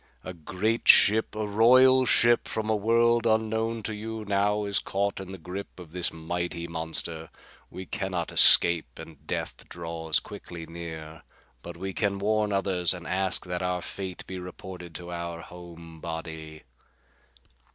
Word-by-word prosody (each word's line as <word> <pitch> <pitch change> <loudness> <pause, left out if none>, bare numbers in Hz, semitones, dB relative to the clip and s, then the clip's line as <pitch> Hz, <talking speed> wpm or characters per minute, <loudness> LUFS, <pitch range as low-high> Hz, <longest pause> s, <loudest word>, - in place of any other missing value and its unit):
"A 90 - -6
great 95 +7 -2
ship, 110 +1 +6
a 110 0 -2
royal 130 +5 +5
ship 120 +1 +4
from 110 0 -2
a - - +3
world 115 +2 +3
unknown 110 0 0
to 110 - -2
you, 110 +1 -6
now 105 +1 +1
is 100 0 +1
caught 100 +1 -2
in 95 -1 -8
the 95 - -7
grip 95 +3 -8
of 85 -3 -11
this 90 0 +1
mighty 85 +1 -4
monster. 80 0 -4 0.4
We 95 - -8
can 95 0 -3
not 85 -3 -3
escape, 85 -2 +5
and 80 -4 -12
death - - -4
draws 80 -2 -2
quickly 85 -2 -9
near. 80 -1 -8 0.4
But 85 +3 -9
we 95 +2 -5
can 100 -1 0
warn 105 +1 +1
others 95 -3 +1
and 90 -1 -10
ask 95 -1 0
that 90 0 -3
our 90 -1 -1
fate 95 -2 -5
be 95 -1 -6
reported 90 -1 -9
to 90 0 -6
our 85 -1 -5
home 85 -2 -12
body." 80 -2 -7
90 Hz, 160 wpm, -27 LUFS, 85-105 Hz, 0.4 s, ship